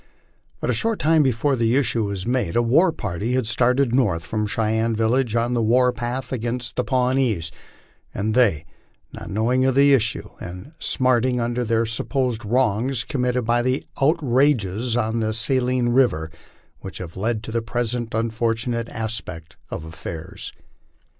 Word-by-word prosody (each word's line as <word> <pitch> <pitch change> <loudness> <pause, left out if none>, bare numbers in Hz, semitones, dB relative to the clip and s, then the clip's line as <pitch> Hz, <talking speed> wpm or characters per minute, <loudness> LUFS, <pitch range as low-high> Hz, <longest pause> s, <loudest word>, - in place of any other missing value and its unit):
But - - -1
a - - +1
short 225 -2 0
time 160 0 +3
before 135 +1 +1
the 115 0 +1
issue 120 -5 +1
was 100 -2 -4
made 120 -8 -1
a 120 - +4
war 160 +10 +4
party 105 - -3
had 130 -2 +1
started 125 +2 +2
north 105 -11 +1
from 105 -1 -2
the - - -3
Cheyenne 110 +1 0
village, 115 +1 +1
on 120 +1 +1
the 120 - +1
war 125 +3 +3
path 120 +3 -4
against 120 0 -3
the 125 - 0
Pawnees; 125 -10 0 0.6
and 110 +2 -2
they, 105 - +3 0.5
not - - -8
knowing 120 +5 +1
of 130 -1 +2
the 140 +1 +6
issue 115 -4 +1
and 90 - -8
smarting 125 -1 +1
under 120 +1 -1
their 115 0 +1
supposed 120 +1 -1
wrongs, 120 +2 +1
committed 125 -3 -1
the 120 +3 +1 0.2
outrages 125 - +2
on 115 0 0
the 110 -1 -1
Saline 125 +1 +1
river 120 -11 +2 0.5
which 95 - -8
have 85 -3 -8
led 110 +2 -2
to 115 - -6
the 115 +1 0
present 120 0 -2
unfortunate 115 +1 -1
aspect 105 -8 -5
of 80 - -6
affairs. 80 +4 -7
120 Hz, 160 wpm, -22 LUFS, 110-130 Hz, 0.6 s, the